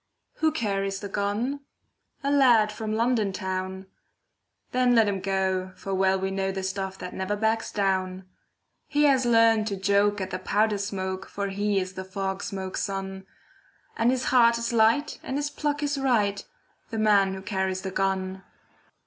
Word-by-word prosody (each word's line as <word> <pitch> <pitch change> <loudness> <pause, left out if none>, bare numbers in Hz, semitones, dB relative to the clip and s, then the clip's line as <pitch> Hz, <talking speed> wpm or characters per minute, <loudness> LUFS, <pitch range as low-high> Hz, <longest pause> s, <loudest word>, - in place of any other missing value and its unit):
Who 315 0 +2
carries 195 -7 -1
the 200 - -6
gun? 210 +8 -1 0.6
A 280 - +1
lad 240 -7 +5
from 215 0 -3
London 225 -3 +1
town. 190 0 -4 0.9
Then 250 -1 +3
let 225 -2 +5
him 200 -1 -1
go, 190 -1 -1
for 195 - -5
well 190 0 +2
we 190 0 -2
know 195 0 -1
The 190 0 -4
stuff 190 0 -3
that 180 - -7
never 190 +2 -2
backs 220 +1 0
down. 190 -2 -1 0.6
He 295 0 +1
has 265 -4 +4
learned 225 -2 +4
to 200 - -1
joke 200 +1 +2
at 190 0 -4
the 185 - -3
powder 210 +2 +1
smoke, 190 -2 -3
For 200 0 -3
he 200 +1 0
is 185 0 -4
the 190 - -6
fog 190 +1 -4
smoke's 190 -1 -4
son, 195 -1 -4 0.7
And 230 +1 +2
his 255 0 +1
heart 235 -2 +6
is 235 0 -2
light 230 +6 +3
and 265 - -3
his 290 0 -2
pluck 295 0 -2
is 285 -1 -1
right— 210 -7 +1 0.4
The 225 - -4
man 200 -3 +3
who 190 - -8
carries 190 -2 -1
the 190 -1 -4
gun. 190 0 -1
200 Hz, 175 wpm, -26 LUFS, 190-230 Hz, 0.9 s, heart